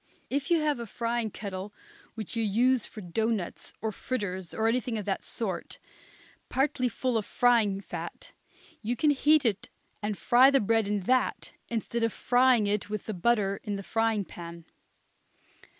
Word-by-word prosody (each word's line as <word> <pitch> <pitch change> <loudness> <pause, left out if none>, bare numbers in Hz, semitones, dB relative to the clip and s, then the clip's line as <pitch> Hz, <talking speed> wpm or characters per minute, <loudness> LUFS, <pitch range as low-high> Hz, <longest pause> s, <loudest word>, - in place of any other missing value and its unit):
If 280 +1 -1
you 340 -1 +4
have 300 -4 +1
a 235 - -5
frying 230 +1 -1
kettle 195 -1 -6 0.4
which 220 -1 -5
you 230 - 0
use 235 +4 +2
for 215 - -9
doughnuts 210 +1 -2
or 220 - -1
fritters, 190 -7 -4
or 220 0 0
anything 240 0 0
of 210 - -4
that 195 -2 -2
sort, 190 -7 -4 0.7
partly 265 -2 +1
full 250 -1 -1
of 215 - -2
frying 225 -5 +3
fat, 170 -3 -7 0.5
you 230 +3 -1
can 300 +5 +3
heat 295 +1 +4
it 210 -4 0 0.3
and 210 -1 -2
fry 255 +2 +6
the 275 -1 +4
bread 225 -1 +2
in 205 -1 0
that 255 +7 +1 0.2
instead 235 0 -2
of 230 0 +2
frying 245 -2 +3
it 205 0 -1
with 210 -2 -4
the 215 - -3
butter 200 0 +1
in 205 -1 -3
a 195 - -6
frying 225 -1 0
pan. 170 -1 -9
225 Hz, 165 wpm, -29 LUFS, 200-245 Hz, 0.7 s, fry